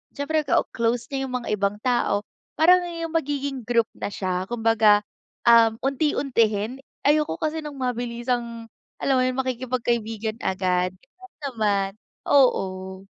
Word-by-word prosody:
Siyempre 305 Hz, +2 st, 0 dB
ka -, -, +3 dB
close 235 Hz, +1 st, 0 dB
niya 270 Hz, -1 st, -2 dB
yung 255 Hz, -, -4 dB
mga 240 Hz, -, -7 dB
ibang 200 Hz, 0 st, 0 dB
tao 240 Hz, -5 st, +1 dB, 0.3 s
parang 355 Hz, +4 st, +6 dB
yung 335 Hz, -1 st, -5 dB
magiging 280 Hz, -4 st, -2 dB
group 230 Hz, -2 st, +2 dB
na -, -, -4 dB
siya 185 Hz, -1 st, -2 dB
kumbaga 225 Hz, -3 st, +4 dB, 0.5 s
um 230 Hz, -1 st, +7 dB
unti-untihin 260 Hz, -5 st, +1 dB, 0.3 s
ayoko 300 Hz, +1 st, +3 dB
kasi 315 Hz, +1 st, -1 dB
ng 295 Hz, -, -6 dB
mabilisang, 240 Hz, -2 st, -3 dB, 0.3 s
alam 270 Hz, -, +2 dB
mo -, -, +3 dB
yung 255 Hz, +1 st, -1 dB
makikipag-kaibigan 235 Hz, -3 st, -2 dB
agad 185 Hz, -1 st, 0 dB, 0.3 s
huwag 380 Hz, 0 st, -15 dB
naman 210 Hz, -7 st, 0 dB, 0.4 s
oo. 190 Hz, -8 st, +2 dB
240 Hz, 130 wpm, -24 LUFS, 215-270 Hz, 0.5 s, um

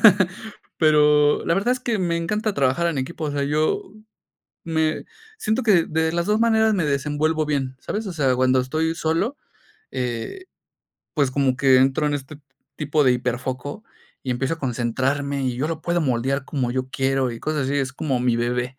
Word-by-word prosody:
¿verdad? 185 Hz, -2 st, +3 dB, 0.5 s
Pero 150 Hz, -1 st, +4 dB
la 165 Hz, -, +3 dB
verdad 215 Hz, +6 st, +2 dB
es 255 Hz, -, -3 dB
que 235 Hz, -4 st, -1 dB
me 170 Hz, -2 st, 0 dB
encanta 210 Hz, +6 st, -1 dB
trabajar 135 Hz, +5 st, +1 dB
en 160 Hz, -5 st, -1 dB
equipo, 155 Hz, +4 st, -4 dB
o 150 Hz, -, -1 dB
sea, 140 Hz, -1 st, -1 dB
yo 150 Hz, +2 st, +1 dB, 0.8 s
me 160 Hz, -1 st, 0 dB, 0.3 s
siento 220 Hz, -, 0 dB
que 195 Hz, -7 st, +4 dB
de 160 Hz, +1 st, 0 dB
las 170 Hz, 0 st, -1 dB
2 210 Hz, +1 st, +2 dB
maneras 220 Hz, -2 st, +4 dB
me 180 Hz, -5 st, 0 dB
desenvuelvo 150 Hz, +2 st, 0 dB
bien, 135 Hz, -3 st, -2 dB
¿sabes? 215 Hz, 0 st, -4 dB
O 185 Hz, -, -4 dB
sea, 135 Hz, -5 st, +2 dB
cuando 130 Hz, 0 st, +3 dB
estoy 155 Hz, +5 st, -1 dB
solo, 165 Hz, -, -1 dB, 0.6 s
eh, 125 Hz, -, -4 dB, 0.7 s
pues 140 Hz, -4 st, +1 dB
como 135 Hz, -2 st, +1 dB
que 130 Hz, -1 st, +5 dB
entro 135 Hz, +3 st, +3 dB
en 145 Hz, -, -1 dB
este 145 Hz, +1 st, -6 dB, 0.4 s
tipo 150 Hz, 0 st, +1 dB
de 125 Hz, -, +5 dB
híperfoco 125 Hz, -, -3 dB, 0.4 s
y 130 Hz, -, -3 dB
empiezo 135 Hz, +6 st, -1 dB
a -, -, -18 dB
concentrarme, 135 Hz, +3 st, -1 dB
y 125 Hz, -2 st, -1 dB
yo 140 Hz, +5 st, -1 dB
lo 165 Hz, -1 st, -4 dB
puedo 175 Hz, 0 st, 0 dB
moldear 135 Hz, +1 st, 0 dB
como 130 Hz, -5 st, -2 dB
yo 130 Hz, 0 st, -2 dB
quiero 135 Hz, -1 st, 0 dB
y 115 Hz, -, -7 dB
cosas 155 Hz, -2 st, -1 dB
así, 140 Hz, -, 0 dB
es 135 Hz, -2 st, -1 dB
como 135 Hz, -4 st, -1 dB
mi 120 Hz, -1 st, +2 dB
bebé, 125 Hz, +2 st, -1 dB
145 Hz, 190 wpm, -23 LUFS, 130-165 Hz, 0.8 s, que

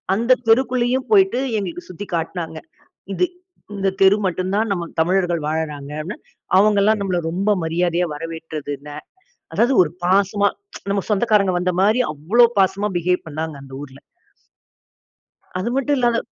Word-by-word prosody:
அந்த 235 Hz, +4 st, +3 dB
தெருக்குள்ளேயும் 255 Hz, +2 st, +2 dB
போய்ட்டு 385 Hz, -9 st, +4 dB, 0.2 s
எங்களுக்கு 180 Hz, -4 st, -5 dB
சுற்றி 195 Hz, +3 st, -8 dB
காட்டினாங்க. 165 Hz, -1 st, -4 dB, 0.6 s
இது 360 Hz, -, +2 dB, 0.5 s
இந்த 195 Hz, -1 st, +1 dB
தெரு 195 Hz, +2 st, +6 dB
மட்டும் 185 Hz, 0 st, -1 dB
தான் 220 Hz, +1 st, +1 dB
நம் 170 Hz, -3 st, -3 dB
தமிழர்கள் 175 Hz, 0 st, +1 dB
வாழ்றாங்க 150 Hz, -3 st, -3 dB
அப்படின்னு. 180 Hz, +7 st, -6 dB, 0.4 s
அவங்க 205 Hz, +1 st, +4 dB
எல்லாம் 215 Hz, +1 st, +3 dB
நம்மை 185 Hz, -3 st, 0 dB
ரொம்ப 195 Hz, +5 st, 0 dB
மரியாதையா 170 Hz, +2 st, 0 dB
வரவேற்றது 160 Hz, -1 st, -6 dB
இல்லை. 145 Hz, +1 st, -10 dB, 0.6 s
அதாவது 245 Hz, +3 st, +3 dB
ஒரு 155 Hz, -, -4 dB, 0.2 s
பாசமா 200 Hz, +2 st, +3 dB, 0.4 s
நம்ம 200 Hz, -1 st, 0 dB
சொந்தக்காரங்க 210 Hz, -2 st, +2 dB
வந்த 180 Hz, 0 st, 0 dB
மாதிரி 215 Hz, +5 st, +3 dB
அவ்வளவு 205 Hz, +12 st, +4 dB
பாசமா 195 Hz, +2 st, +2 dB
பிஹேவ் 180 Hz, +1 st, 0 dB
பண்ணாங்க 155 Hz, +1 st, -4 dB
அந்த 135 Hz, -1 st, -13 dB
ஊர்ல. 140 Hz, -1 st, -11 dB, 1.6 s
அது 185 Hz, +6 st, -2 dB
மட்டும் 280 Hz, +2 st, +1 dB
இல்லாம 240 Hz, -2 st, +2 dB
190 Hz, 140 wpm, -20 LUFS, 165-215 Hz, 1.6 s, தெரு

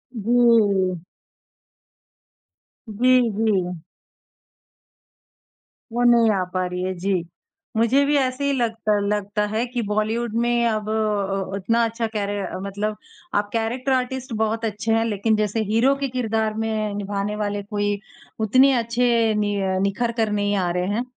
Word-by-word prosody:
जी। 215 Hz, -5 st, +3 dB, 1.9 s
जी, 225 Hz, +4 st, +1 dB, 0.3 s
जी। 190 Hz, -6 st, 0 dB, 2.1 s
वो 240 Hz, +1 st, 0 dB
नहीं 235 Hz, -2 st, +5 dB
आ 195 Hz, -3 st, +1 dB
पा 185 Hz, 0 st, 0 dB
रही 180 Hz, 0 st, -4 dB
है, 185 Hz, 0 st, -1 dB
जी। 185 Hz, 0 st, -1 dB, 0.5 s
मुझे 235 Hz, +5 st, +3 dB
भी 290 Hz, +1 st, +2 dB
ऐसे 260 Hz, 0 st, 0 dB
ही 280 Hz, -, +2 dB
लगता 225 Hz, -4 st, 0 dB
लगता 210 Hz, 0 st, -1 dB
है 220 Hz, +3 st, -1 dB
कि 245 Hz, 0 st, -3 dB
बॉलीवुड 215 Hz, +2 st, -1 dB
में 240 Hz, 0 st, +2 dB
अब 215 Hz, -2 st, -2 dB
अ, -, -, 0 dB, 0.5 s
अ 190 Hz, 0 st, -4 dB
उतना 230 Hz, +4 st, +1 dB
अच्छा 230 Hz, 0 st, -2 dB
कैरेट 205 Hz, -2 st, -2 dB, 0.2 s
मतलब 205 Hz, +2 st, -3 dB, 0.4 s
आप 205 Hz, 0 st, +1 dB
कैरेक्टर 235 Hz, +4 st, -1 dB
आर्टिस्ट 260 Hz, 0 st, -1 dB
बहुत 220 Hz, +1 st, 0 dB
अच्छे 220 Hz, +1 st, -2 dB
हैं 225 Hz, 0 st, +2 dB
लेकिन 220 Hz, 0 st, +1 dB
जैसे 215 Hz, +1 st, 0 dB
हीरो 225 Hz, +6 st, +3 dB
के 275 Hz, 0 st, -2 dB
किरदार 220 Hz, -3 st, 0 dB
में 215 Hz, -2 st, -2 dB
निभाने 205 Hz, 0 st, -3 dB
वाले 205 Hz, -1 st, -2 dB
कोई 205 Hz, 0 st, -2 dB, 0.5 s
उतने 260 Hz, +5 st, +5 dB
अच्छे 235 Hz, -1 st, +2 dB
नि 205 Hz, -1 st, 0 dB, 0.3 s
निखर 220 Hz, +4 st, 0 dB
कर 220 Hz, -1 st, +1 dB
नहीं 205 Hz, 0 st, 0 dB
आ -, -, 0 dB
रहे 180 Hz, 0 st, 0 dB
हैं। 240 Hz, +3 st, -1 dB
220 Hz, 145 wpm, -22 LUFS, 205-235 Hz, 2.1 s, नहीं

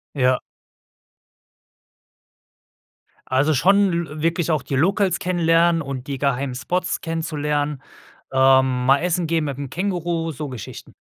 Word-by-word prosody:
Ja. 130 Hz, -2 st, +2 dB, 2.9 s
Also 140 Hz, +4 st, +2 dB
schon 195 Hz, +7 st, +4 dB
l 155 Hz, -3 st, -3 dB
wirklich 165 Hz, 0 st, 0 dB
auch 155 Hz, -4 st, +1 dB
die 135 Hz, -, -3 dB
Locals 190 Hz, +4 st, +2 dB
kennenlernen 170 Hz, -1 st, +2 dB
und 135 Hz, -2 st, -6 dB
die 140 Hz, -2 st, -4 dB
geheimen 140 Hz, -1 st, -1 dB
Spots 180 Hz, +8 st, -2 dB
kennenlernen, 150 Hz, -3 st, -2 dB, 0.5 s
ähm, 130 Hz, -1 st, +3 dB
mal 135 Hz, +2 st, +5 dB
essen 175 Hz, 0 st, 0 dB
gehen 165 Hz, -1 st, 0 dB
mit 140 Hz, -3 st, -4 dB
dem 140 Hz, -2 st, -6 dB
Känguru, 175 Hz, -2 st, -2 dB
so 150 Hz, +1 st, -6 dB
Geschichten. 125 Hz, -6 st, -9 dB
155 Hz, 125 wpm, -21 LUFS, 135-170 Hz, 2.9 s, mal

